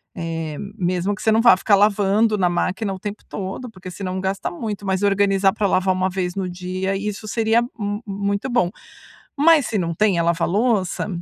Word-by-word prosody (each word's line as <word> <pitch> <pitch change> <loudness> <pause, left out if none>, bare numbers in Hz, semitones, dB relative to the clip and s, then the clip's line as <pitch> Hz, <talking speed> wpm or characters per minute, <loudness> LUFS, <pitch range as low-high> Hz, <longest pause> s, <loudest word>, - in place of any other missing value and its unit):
Eh, 165 -2 -4 0.2
mesmo 180 +1 0
que 205 - -8
você 220 - +2
não 225 - +4
vá 235 -4 +7
ficar 200 +2 +3
lavando 205 +1 +3
na 180 -2 +2
máquina 190 +3 -1
o 190 - -7
tempo 205 +1 -6
todo, 200 +6 -5
porque 185 -4 -10
senão 185 0 -4
gasta 190 +1 -2
muito, 215 - -5
mas 190 0 0
organizar 195 -1 +3
pra 210 -2 0
lavar 185 0 +2
uma 185 0 0
vez 180 -1 -2
no 190 -2 -2
dia, 185 +2 -3
isso 210 +1 -4
seria 225 +1 +2
m 215 -3 -4
muito 200 +4 -2
bom. 235 -8 +2 0.7
Mas 305 -1 +5
se 220 - -1
não 170 -3 -1
tem 205 -1 +2
a 170 - +2
lava-louça, 185 +4 +1
195 Hz, 195 wpm, -21 LUFS, 185-215 Hz, 0.7 s, vá